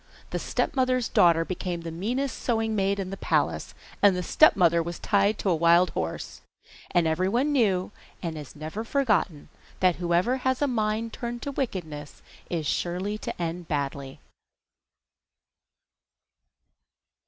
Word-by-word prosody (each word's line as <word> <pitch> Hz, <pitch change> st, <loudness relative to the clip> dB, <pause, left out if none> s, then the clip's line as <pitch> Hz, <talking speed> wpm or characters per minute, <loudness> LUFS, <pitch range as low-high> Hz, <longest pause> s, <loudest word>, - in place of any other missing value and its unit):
The -, -, -1 dB
stepmother's 255 Hz, -3 st, 0 dB
daughter 165 Hz, -1 st, +4 dB
became 180 Hz, -1 st, -4 dB
the 165 Hz, 0 st, -6 dB
meanest 245 Hz, +11 st, -2 dB
sewing 225 Hz, -2 st, 0 dB
maid 200 Hz, 0 st, +1 dB
in 190 Hz, -1 st, -4 dB
the 195 Hz, -, -5 dB
palace, -, -, 0 dB, 0.3 s
the 185 Hz, -3 st, +4 dB
stepmother 175 Hz, -, +5 dB
was 170 Hz, +1 st, -5 dB
tied 200 Hz, 0 st, +2 dB
to 195 Hz, -, -1 dB
a -, -, +3 dB
wild 170 Hz, +2 st, +4 dB
horse, 80 Hz, 0 st, -4 dB, 0.5 s
and 175 Hz, -1 st, +2 dB
every 165 Hz, +4 st, +1 dB
one 255 Hz, +8 st, +1 dB
knew 205 Hz, -9 st, +2 dB, 0.3 s
and 165 Hz, -3 st, -4 dB
has 150 Hz, -2 st, -9 dB
never 155 Hz, +8 st, -5 dB
forgotten 215 Hz, -, 0 dB, 0.3 s
that 180 Hz, -2 st, +3 dB
whoever 175 Hz, +8 st, +1 dB
has 260 Hz, 0 st, 0 dB
a 290 Hz, -, +2 dB
mind 220 Hz, -2 st, -1 dB
turned 240 Hz, 0 st, -5 dB
to 285 Hz, -, -3 dB
wickedness 160 Hz, -, -5 dB, 0.3 s
is 165 Hz, -3 st, -2 dB
sure 175 Hz, +4 st, -1 dB, 0.2 s
to -, -, -6 dB
end 170 Hz, 0 st, -3 dB
badly. 140 Hz, -2 st, -3 dB
185 Hz, 140 wpm, -26 LUFS, 170-230 Hz, 0.5 s, stepmother